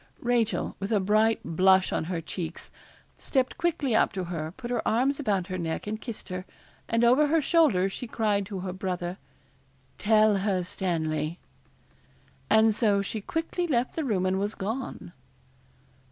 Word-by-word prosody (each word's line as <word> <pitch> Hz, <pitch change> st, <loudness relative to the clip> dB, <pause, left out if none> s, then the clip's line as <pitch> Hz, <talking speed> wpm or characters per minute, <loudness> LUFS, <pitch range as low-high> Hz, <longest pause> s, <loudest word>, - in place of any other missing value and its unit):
Rachel, 240 Hz, -2 st, 0 dB
with 195 Hz, +3 st, -4 dB
a 210 Hz, -, +3 dB
bright 215 Hz, +3 st, +2 dB
blush 190 Hz, +3 st, +3 dB
on -, -, -1 dB
her 170 Hz, -1 st, -3 dB
cheeks, 165 Hz, 0 st, -6 dB, 0.5 s
stepped 260 Hz, +4 st, -1 dB
quickly 325 Hz, -8 st, 0 dB
up -, -, +3 dB
to 190 Hz, -2 st, -3 dB
her, 165 Hz, -3 st, -4 dB
put 245 Hz, -2 st, -6 dB
her 240 Hz, -, 0 dB
arms 265 Hz, +6 st, +2 dB
about 200 Hz, -9 st, 0 dB
her 185 Hz, -1 st, -4 dB
neck 165 Hz, -1 st, -3 dB
and 215 Hz, +1 st, -4 dB
kissed 230 Hz, -4 st, -7 dB
her, 185 Hz, 0 st, -4 dB, 0.5 s
and 230 Hz, +1 st, +2 dB
over 255 Hz, +6 st, +5 dB
her 325 Hz, +2 st, +3 dB
shoulder 290 Hz, -, +3 dB
she 215 Hz, +5 st, -6 dB
cried 210 Hz, -3 st, 0 dB
to 190 Hz, -2 st, -5 dB
her 185 Hz, -1 st, -4 dB
brother 180 Hz, -1 st, -4 dB, 0.8 s
'Tell 215 Hz, -1 st, +4 dB
her, 190 Hz, -2 st, 0 dB
Stanley.' 160 Hz, -3 st, -2 dB, 1.1 s
And 220 Hz, 0 st, +5 dB
so 205 Hz, -2 st, +2 dB
she 215 Hz, +2 st, -4 dB
quickly 330 Hz, -, -2 dB
left 250 Hz, -5 st, 0 dB
the 320 Hz, -, -1 dB
room 200 Hz, -9 st, 0 dB
and 185 Hz, +1 st, +1 dB
was 205 Hz, +2 st, -2 dB
gone. 210 Hz, -3 st, -5 dB
205 Hz, 165 wpm, -27 LUFS, 185-240 Hz, 1.1 s, over